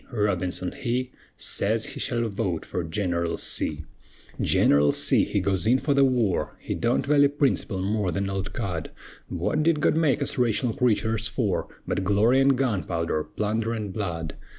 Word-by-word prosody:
Robinson 90 -5 -1
he 125 0 -2 0.3
Sez 110 +2 0
he - - -5
shall 120 -1 0
vote 95 -5 -2
fer 90 - -3
Gineral 85 0 -1
C. 75 0 -3 0.6
Gineral 70 0 +4
C. - - +3
he - - -1
goes 95 +1 0
in 125 +3 +5
fer 140 +2 0
the 140 0 +4
war; 120 -8 +1
He - - -4
don't 120 +1 0
vally 145 0 +5
princerple 140 -9 0
more 105 0 0
'n 90 - -3
an 100 - -2
old 95 0 -3
cud; 85 -5 -4 0.4
Wut 155 - -1
did 160 -1 +2
God - - +2
make 150 -3 +2
us - - -2
raytional 120 -1 +1
creeturs 110 -2 +1
fer, 105 -2 -1 0.2
But 95 - -1
glory 105 +7 +3
an' 135 0 +4
gunpowder, 90 - -1
plunder 110 +2 -1
an' 105 -2 -4
blood? 85 -5 -4
105 Hz, 170 wpm, -25 LUFS, 95-125 Hz, 0.6 s, in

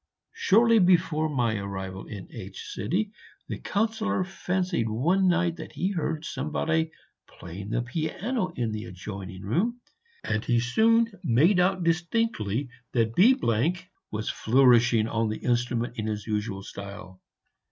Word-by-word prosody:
Shortly 230 +2 +4
before 170 -4 +3
my 120 -6 0
arrival 95 -1 -6
in 100 -4 -8
H, - - -8
the 200 - -4
Councillor 205 - 0
fancied 180 - -1
one 170 - +2
night 175 -1 +2
that - - -9
he 185 +3 -1
heard 160 -3 -2
somebody 160 +3 -1 0.4
playing 95 +4 -9
the 120 +2 0
piano 180 - -2
in 115 -3 -1
the 110 +1 -4
adjoining 95 0 -8
room, 195 - 0 0.4
and 110 0 -1
he 120 -1 +2
soon 225 - +3
made 165 - +4
out 185 0 +2
distinctly 165 - 0 0.3
that 115 -2 +1
B 230 - +6 0.7
was 110 0 -4
flourishing 120 -2 +4
on 115 -1 0
the 110 - -3
instrument 120 -1 0
in 110 -1 -2
his 105 -2 -3
usual 105 -2 -3
style. 100 -2 -9
125 Hz, 130 wpm, -27 LUFS, 110-180 Hz, 0.7 s, B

